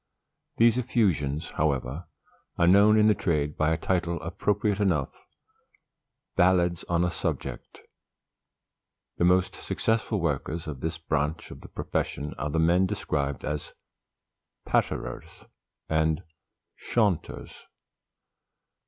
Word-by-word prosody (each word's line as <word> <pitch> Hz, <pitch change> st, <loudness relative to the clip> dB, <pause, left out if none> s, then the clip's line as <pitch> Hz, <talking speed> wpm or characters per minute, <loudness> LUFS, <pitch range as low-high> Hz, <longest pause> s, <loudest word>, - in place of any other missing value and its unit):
These 115 Hz, +1 st, +5 dB
effusions, 85 Hz, -, 0 dB
however, 70 Hz, +1 st, -1 dB, 0.5 s
are 85 Hz, -, +4 dB
known 100 Hz, +4 st, +6 dB
in 105 Hz, -, +5 dB
the 105 Hz, -, +6 dB
trade 75 Hz, -6 st, -1 dB
by 75 Hz, 0 st, +1 dB
a 80 Hz, -, +1 dB
title 85 Hz, -1 st, -1 dB
appropriate 105 Hz, 0 st, 0 dB
enough, 90 Hz, -10 st, +1 dB, 1.2 s
"BALLADS 90 Hz, -1 st, +3 dB
ON 85 Hz, 0 st, +1 dB
A 90 Hz, -, +1 dB
SUBJECT." -, -, -4 dB, 1.4 s
The 85 Hz, -, +2 dB
most 90 Hz, +1 st, +3 dB
successful 110 Hz, -1 st, -1 dB
workers 80 Hz, 0 st, -2 dB
of 75 Hz, -4 st, -6 dB
this 80 Hz, +2 st, -3 dB
branch 75 Hz, 0 st, -2 dB
of -, -, -10 dB
the -, -, -12 dB
profession 75 Hz, +1 st, -3 dB
are 70 Hz, +3 st, -2 dB
the 75 Hz, -, -1 dB
men 85 Hz, +3 st, +3 dB
described 70 Hz, -5 st, -2 dB
as 75 Hz, -1 st, -4 dB, 0.9 s
patterers -, -, -2 dB, 0.4 s
and 80 Hz, +1 st, +1 dB, 0.6 s
chaunters. 105 Hz, -8 st, -1 dB
85 Hz, 110 wpm, -27 LUFS, 75-95 Hz, 1.4 s, known